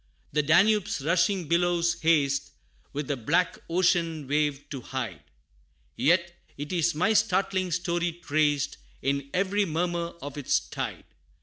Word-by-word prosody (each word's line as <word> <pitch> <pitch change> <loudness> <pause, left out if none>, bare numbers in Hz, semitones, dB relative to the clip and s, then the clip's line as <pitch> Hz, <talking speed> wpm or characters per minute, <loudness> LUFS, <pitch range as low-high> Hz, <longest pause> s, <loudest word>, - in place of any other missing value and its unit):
The 150 - +3
Danube's 180 +4 +3
rushing 175 +1 +2
billows 170 0 +1
haste 145 -4 +2 0.4
With 145 -1 -4
the 145 - 0
black 165 +9 0
ocean 165 -4 +1
wave 145 0 0
to 135 -3 -5
hide 115 - -5 0.7
Yet 175 - +2 0.2
is 160 +3 0
my 180 +8 +2
startling 190 -3 +1
story 175 0 -1
traced, 150 -3 0 0.3
In 140 0 -1
every 195 +2 +1
murmur 170 0 -2
of 145 +1 -6
its 140 - +2
tide. - - -6
170 Hz, 125 wpm, -27 LUFS, 145-180 Hz, 0.7 s, The